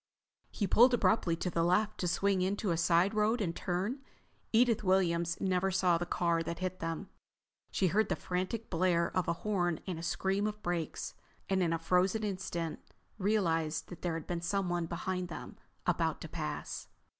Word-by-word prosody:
He 205 - -2
pulled 245 +6 +6
abruptly 215 -7 +2
to 180 +2 -3
the 165 - +1
left 210 +5 +2
to 180 - 0
swing 195 +2 +2
into 195 +1 0
a - - +2
side 170 +4 +3
road 215 +3 +2
and 170 -6 -1
turn. 190 +9 -2 0.5
Edith 230 -1 +4
Williams 170 -3 +2
never 190 0 +1
saw 180 -2 +3
the 175 - -3
car 170 -1 +1
that 170 +1 -4
hit 185 0 -3
them. 165 +4 -4 0.6
She 195 - 0
heard 200 +4 +2
the - - +1
frantic 185 +5 -3
blare 170 -1 +2
of 185 -2 +1
a - - +2
horn 175 -6 +1
and 180 -4 -4
a - - -5
scream 195 +4 0
of 210 0 -6
brakes, 170 -3 -2 0.4
and 190 -1 +3
in 170 -2 +2
a 165 - +1
frozen 180 +6 +2
instant 185 -5 -3 0.4
realized 165 -6 +1
that 175 - -9
there 170 -2 -1
had 165 - -5
been 175 -1 -3
someone 175 -2 0
behind 180 +2 -3
them, 170 - -8 0.3
about - - +1
to - - -5
pass. - - -5
180 Hz, 180 wpm, -32 LUFS, 170-200 Hz, 0.6 s, pulled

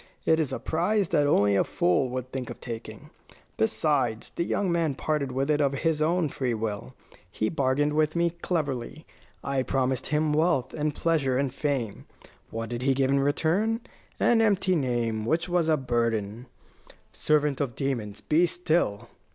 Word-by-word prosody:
It 160 0 +4
is 155 -4 0
a - - -2
prize 190 +4 0
that 150 -3 +3
only 100 -8 +3
a - - +4
fool 90 +9 +1
would 130 0 -5
think 130 -3 -4
of - - -8
taking. 115 -2 -8 0.4
Besides, 115 -1 0
the - - -2
young 190 +1 0
man 165 -5 +1
parted 145 -2 -1
with 135 +3 0
it 150 0 +2
of 140 -1 +2
his 155 +2 0
own 170 +1 +2
free 130 -4 -2
will. 110 +3 -4 0.3
He 110 +3 -1
bargained 145 0 +1
with 155 +1 +1
me 170 0 +2
cleverly. 155 -5 -3 0.4
I 135 -1 0
promised 130 -1 -1
him 150 0 +1
wealth 150 -5 +1
and 150 -1 -2
pleasure 150 -6 +1
and 135 -2 -1
fame. 135 -8 -2 0.4
What 115 0 -5
did 120 0 -4
he 135 +1 +2
give 135 0 +2
in 140 - +3
return? 170 - +1 0.4
An 230 -1 +4
empty 195 -4 +2
name, 120 -6 -1
which 160 +9 0
was 175 -2 +1
a 155 - +4
burden 115 -3 -1 0.3
" - - -22 0.2
"Servant 150 -2 +1
of 125 -5 -2
demons, 115 -7 -3
be 165 +3 +3
still!" 165 - 0
140 Hz, 175 wpm, -27 LUFS, 125-160 Hz, 0.4 s, It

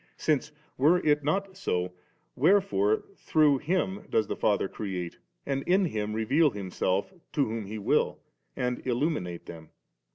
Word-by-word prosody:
Since, 150 -1 0 0.3
were 155 +7 +5
it 150 -1 +3
not 190 +6 -1
so, 90 - -1 0.4
wherefore 140 - +3
through 150 -3 +3
Him 190 +5 -1
does 110 - +2
the - - -3
Father 100 -2 +1
create, 95 -4 -5 0.3
and 135 -1 -1
in 190 +2 +4
Him 105 -8 -2
reveal 135 +9 +3
Himself 100 - -2 0.2
to 145 - +2
whom 110 -2 -4
He 110 +2 -5
will, 105 - +1 0.4
and 125 0 -1
illuminate 120 - -1
them? 80 -2 -10
130 Hz, 140 wpm, -28 LUFS, 100-155 Hz, 0.4 s, were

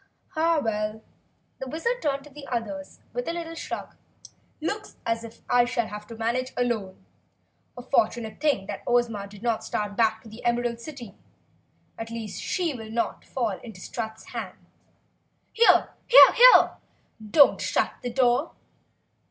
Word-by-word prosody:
"Ha, 330 -1 +2
well," 215 0 -2 0.6
the 265 - -5
Wizard 465 - -2
turned 280 -2 -1
to 295 - -15
the 280 0 -11
others 205 -6 -5
with 245 +1 -3
a - - 0
little 335 -1 -5
shrug. 330 - -6 0.6
"Looks 410 +7 -4
as 230 0 -1
if 230 -1 -12
I 245 0 +4
shall 240 -2 -1
have 210 0 -8
to 230 - -9
manage 235 +3 -2
alone. 225 -6 -2 0.7
A 245 - -7
fortunate 225 -3 0
thing 280 -11 +1 0.2
Ozma 235 -4 +1
did 200 +1 -14
not 230 -2 0
start 205 -1 -3
back 220 -1 +1
to - - -13
the 220 +3 -12
Emerald 240 -1 0
City. 240 -6 -9 0.9
At 225 0 -5
least 225 -3 -6
she 350 -4 -1
will 225 -3 -8
not 230 +1 -2
fall 225 -7 -2
into 220 -6 -11
Strut's 220 +3 -6
hands. - - -7 0.8
Here, 460 +1 +5 0.2
HERE! - - +8 0.5
Don't 285 +4 +6
shut - - +1
the 245 - -3
door!" 245 +4 +2
235 Hz, 150 wpm, -26 LUFS, 220-275 Hz, 0.9 s, HERE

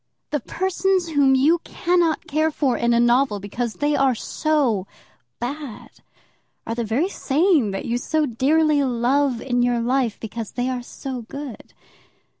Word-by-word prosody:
The 295 - 0
persons 375 - 0
whom 280 -3 +4
you 305 +6 +4
cannot 345 -2 0
care 310 +1 +1
for 280 -4 0
in 235 0 +1
a 235 - +3
novel, 240 -2 +3
because 220 +4 -4
they 290 0 0
are 270 -3 +3
so 255 - 0 0.5
bad, 265 -1 -6 0.7
are 225 - -3
the 235 0 -2
very 235 - 0
same 310 - +2
that 195 0 -4
you 240 +1 -1
so 310 +4 0
dearly 290 +4 +2
love 255 +1 +1
in 245 -2 0
your 245 -1 +2
life, 245 -1 0
because 225 0 -6
they 245 +1 -1
are 250 -1 -2
so 255 +1 -6
good. 270 +1 -9
265 Hz, 155 wpm, -22 LUFS, 235-305 Hz, 0.7 s, whom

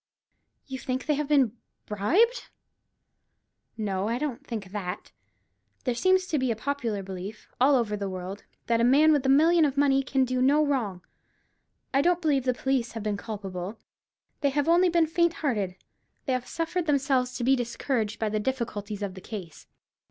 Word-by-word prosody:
"You 265 -1 -6
think 255 0 -3
they 305 - +2
have 295 0 -1
been 270 -6 +3 0.3
bribed?" 365 - +1 1.3
"No; 200 -2 -1
I 230 +2 0
don't 280 -1 -4
think 215 -8 -6
that. 195 -2 -5 0.7
There 250 - 0
seems 370 +8 +3
to 310 -5 -1
be 260 -1 0
a 230 - +1
popular 230 -5 -2
belief, 190 +2 -8
all 275 +2 +6
over 225 -4 +1
the 200 -1 -3
world, 185 +2 -6 0.2
that 230 -1 +2
a - - +3
man 285 +6 +6
with 290 -3 +2
a - - +3
million 320 +5 +5
of 280 -2 +1
money 275 -1 +4
can 265 0 +1
do 255 0 -1
no 290 +4 +4
wrong. 220 -11 -1 0.9
I 275 - +4
don't 350 +2 +2
believe 290 -6 +1
the 255 - +2
police 260 -2 -1
have 225 -2 -5
been 210 -1 -1
culpable; 200 -2 -6 0.6
they 285 - +2
have 285 +2 0
only 350 +2 +5
been 340 -1 +3
faint 340 +1 +2
hearted. 205 -9 0 0.5
They 265 - 0
have 250 0 -2
suffered 330 +1 -2
themselves 265 -3 +1
to 245 - -3
be 265 +3 +4
discouraged 240 -2 -2
by 220 - -1
the 215 0 -1
difficulties 210 -4 -3
of 195 -2 -3
the 185 - -10
case. 180 -7 -8
255 Hz, 180 wpm, -27 LUFS, 210-285 Hz, 1.3 s, all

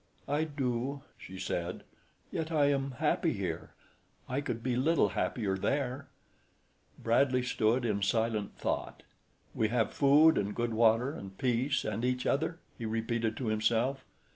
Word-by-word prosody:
"I 145 +3 +1
do," 135 -2 -2
she 95 - -10
said, 90 -1 -3 0.5
"yet 160 0 -3
I 145 -3 +3
am 135 -1 -1
happy 160 +2 +1
here. 90 -6 -4 0.5
I 130 +2 -1
could 115 -5 -4
be 125 -2 0
little 140 -3 +3
happier 95 +1 -1
there." 135 +6 -1 0.9
Bradley 125 +2 +2
stood 120 0 +1
in 105 -3 0
silent 110 0 0
thought. - - -3 0.5
"`We 110 - +1
have 115 -1 +1
food 150 +3 +5
and 100 0 -2
good 120 -1 -1
water 115 +3 +3
and 95 -6 -9
peace 130 +4 +1
and 110 +2 -2
each 125 0 0
other!'" 160 +4 0 0.2
he 115 - -4
repeated 115 0 -1
to 125 -4 -2
himself. 115 +5 +1
120 Hz, 145 wpm, -31 LUFS, 110-140 Hz, 0.9 s, food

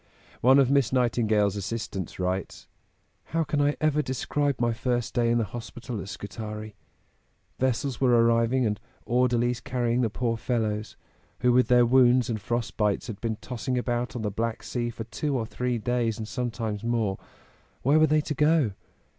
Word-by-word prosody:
One 130 +3 +6
of 135 -2 +4
Miss 140 -5 +3
Nightingale's 110 -5 +2
assistants 100 -3 -4
writes: 95 +1 -3 0.6
"How 165 0 0
can 145 -1 0
I 145 +1 +2
ever 155 -1 +2
describe 140 +1 -1
my 120 -1 +1
first 120 0 -1
day 120 -1 +2
in 120 - +3
the 115 - +2
hospital 115 +1 -6
at 95 - -8
Scutari? 105 +1 -7 0.9
Vessels 130 +1 -1
were 130 - +4
arriving 115 +2 +3
and 105 -1 -1 0.3
orderlies 120 -1 +1
carrying 120 -1 0
the 115 - +1
poor 115 +1 -1
fellows, 110 -3 -2 0.4
who 125 - +4
with 125 +1 +4
their 125 -1 +5
wounds 125 -1 +4
and 110 -2 -3
frost 120 +2 -3
bites 105 -2 +1
had 110 -4 -7
been 115 -2 -1
tossing 125 +1 -3
about 120 0 -2
on 115 - -3
the 105 - -1
Black 115 +2 -2
Sea 120 -1 -2
for 115 -1 -6
two 135 +5 -2
or 115 - -2
three 125 +2 -2
days 115 0 0
and 110 -2 -5
sometimes 115 -4 -3
more. 115 -5 0 0.6
Where 145 +5 +4
were 155 - +5
they 155 +1 +3
to 150 - -3
go? 150 -4 +3
120 Hz, 175 wpm, -27 LUFS, 110-125 Hz, 0.9 s, One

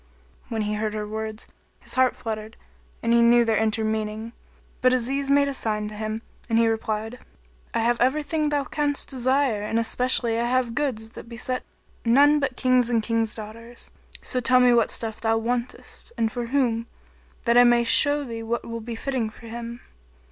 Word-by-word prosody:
When 225 -2 -1
he 210 0 -2
heard 215 0 -2
her 210 -1 -3
words, 220 0 -5 0.4
his - - -2
heart 255 -1 +3
fluttered 220 -3 -6 0.5
and 230 0 +2
he 235 - +5
knew 240 +1 +6
not - - +2
their 225 -1 +2
inner 220 0 +1
meaning; 220 +1 -3 0.5
but 255 0 +4
Aziz 270 +3 0
made 280 0 +4
a 280 - -2
sign 215 -4 -1
to - - -9
him 215 +1 -4 0.3
and 225 - +2
he 230 0 +4
replied, 220 +1 -2 0.5
"I 230 - 0
have 235 +1 +1
everything 300 +4 +1
thou 290 -1 0
canst 290 +1 -1
desire 260 -3 +1
and 215 +2 -1
especially 230 0 +1
I 235 - +1
have 250 -1 +1
goods 235 -5 -2
that 230 - -11
besit 245 +2 -3 0.4
none 285 +5 +5
but 265 -3 -2
Kings 255 -2 +3
and 230 -2 +1
King's 225 -1 0
daughters; 230 +2 -9 0.3
so 255 - -1
tell 255 +1 +5
me 250 -1 +5
what 235 -1 +3
stuff 220 -2 -4
thou 225 0 +2
wantest 240 - -4
and 225 -1 +1
for 240 0 -4
whom, 235 -3 0 0.6
that 235 -1 +2
I 245 - +8
may 240 -1 +5
show 290 +4 +4
thee 230 -4 -6
what 230 +1 -3
will 230 0 -5
be 230 +1 -6
fitting 250 -2 -2
for 225 - -15
him." 235 +1 -7
235 Hz, 190 wpm, -24 LUFS, 225-255 Hz, 0.6 s, I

